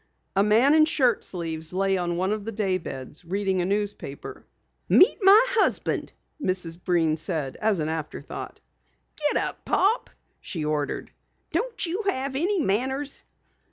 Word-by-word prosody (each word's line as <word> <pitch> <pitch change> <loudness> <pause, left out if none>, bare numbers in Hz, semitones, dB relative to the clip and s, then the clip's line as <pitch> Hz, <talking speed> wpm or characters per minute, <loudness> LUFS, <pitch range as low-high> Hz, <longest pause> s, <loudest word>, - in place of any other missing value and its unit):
A 195 - +4
man 225 +8 +4
in 310 0 +6
shirt 260 -7 +2
sleeves 165 -2 -4
lay 195 +1 +1
on 175 -2 -1
one 185 +2 0
of 215 -1 -2
the 225 - -4
day 195 -4 0
beds, 135 -1 -8
reading 190 +1 -1
a - - 0
newspaper. 200 -8 -4 0.4
"Meet 375 - +6
my 395 +2 +8
husband," 460 -3 0 0.3
Mrs. 180 -5 -2
Breen 165 -4 +2
said 155 -4 -3
as 215 -2 +1
an 155 -2 -1
afterthought. 160 -1 -6 0.6
"Get 295 -1 +3
up, - - -3
Pop!" 410 +5 +1 0.3
she 160 -4 -5
ordered. 150 -1 -2 0.4
"Don't 470 -5 -1
you 360 +5 -1
have 265 -6 -1
any 365 +7 +1
manners?" 265 +4 -1
195 Hz, 150 wpm, -25 LUFS, 170-275 Hz, 0.6 s, my